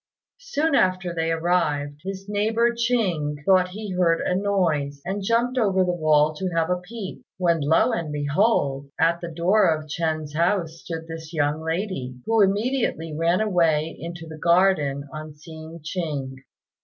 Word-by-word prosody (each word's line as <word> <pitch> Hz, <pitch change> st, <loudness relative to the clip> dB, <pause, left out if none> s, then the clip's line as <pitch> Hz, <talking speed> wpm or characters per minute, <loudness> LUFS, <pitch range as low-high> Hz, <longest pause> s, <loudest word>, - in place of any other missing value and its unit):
Soon 405 Hz, -12 st, -1 dB
after 185 Hz, -6 st, +2 dB
they 165 Hz, -1 st, -1 dB
arrived, 155 Hz, -4 st, 0 dB
his 195 Hz, +1 st, -6 dB
neighbour 220 Hz, +3 st, +1 dB
Ching 205 Hz, -12 st, 0 dB
thought 185 Hz, -2 st, +5 dB
he 205 Hz, +2 st, -7 dB
heard 175 Hz, -2 st, +2 dB
a -, -, 0 dB
noise, 170 Hz, -8 st, 0 dB
and 195 Hz, +3 st, -3 dB
jumped 235 Hz, +5 st, +1 dB
over 195 Hz, -4 st, +3 dB
the 180 Hz, -1 st, 0 dB
wall 155 Hz, -2 st, +3 dB
to 190 Hz, +2 st, -2 dB
have 165 Hz, +1 st, +1 dB
a 180 Hz, -, +2 dB
peep, 205 Hz, +1 st, -8 dB, 0.2 s
when 170 Hz, -3 st, +2 dB
lo 160 Hz, -, +3 dB
and 170 Hz, -9 st, -2 dB
behold! 145 Hz, -2 st, +1 dB
at 170 Hz, +1 st, +2 dB
the 170 Hz, -, -5 dB
door 175 Hz, +6 st, +3 dB
of 155 Hz, -1 st, -1 dB
Ch'ên's 155 Hz, -1 st, -2 dB
house 170 Hz, 0 st, 0 dB
stood 165 Hz, -1 st, -6 dB
this 160 Hz, -1 st, -8 dB
young 150 Hz, 0 st, 0 dB
lady, 160 Hz, -7 st, -3 dB
who 225 Hz, -1 st, +3 dB
immediately 200 Hz, -, 0 dB
ran 170 Hz, +4 st, +2 dB
away 165 Hz, -6 st, +1 dB
into 170 Hz, 0 st, -7 dB
the 160 Hz, -1 st, -10 dB
garden 170 Hz, -6 st, +2 dB
on 155 Hz, -1 st, -7 dB
seeing 160 Hz, +1 st, -11 dB
Ching. 150 Hz, -6 st, -3 dB
170 Hz, 160 wpm, -24 LUFS, 155-195 Hz, 0.2 s, thought